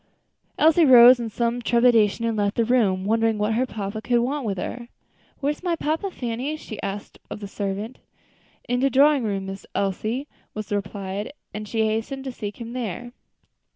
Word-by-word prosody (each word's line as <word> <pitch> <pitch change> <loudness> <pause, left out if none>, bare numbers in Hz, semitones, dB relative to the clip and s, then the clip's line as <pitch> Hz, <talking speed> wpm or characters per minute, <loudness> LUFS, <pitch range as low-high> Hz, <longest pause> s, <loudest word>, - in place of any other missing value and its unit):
Elsie 320 +2 +5
rose 250 -2 +9
in 230 -1 -3
some 235 +2 -1
trepidation 235 -2 +3
and 230 -1 0
left 205 -1 0
the 230 - +2
room, 210 -6 +2
wondering 225 +1 +2
what 210 +1 0
her 250 +3 +1
papa 210 -1 -5
could 240 +1 +1
want 265 +4 0
with 200 -3 -2
her. 240 +6 -5 0.5
"Where 285 +1 +1
is 295 - -8
papa, 335 +1 -1
Fanny?" 255 -1 -3
she 220 -8 -8
asked 200 +1 -6
of - - -6
the 205 - -6
servant. 200 +4 -4 0.7
"In 245 0 0
de 275 +2 +3
drawin' 280 +1 +4
room, 200 -3 -2
Miss 195 0 -7
Elsie," 215 +7 -1 0.3
was 215 -1 -5
the 205 - 0
reply; 200 0 -4 0.2
and 210 +1 -6
she 220 +1 0
hastened 225 +5 -2
to 265 - -4
seek 210 -3 -7
him 235 0 -7
there. 240 0 -4
230 Hz, 185 wpm, -24 LUFS, 205-255 Hz, 0.7 s, rose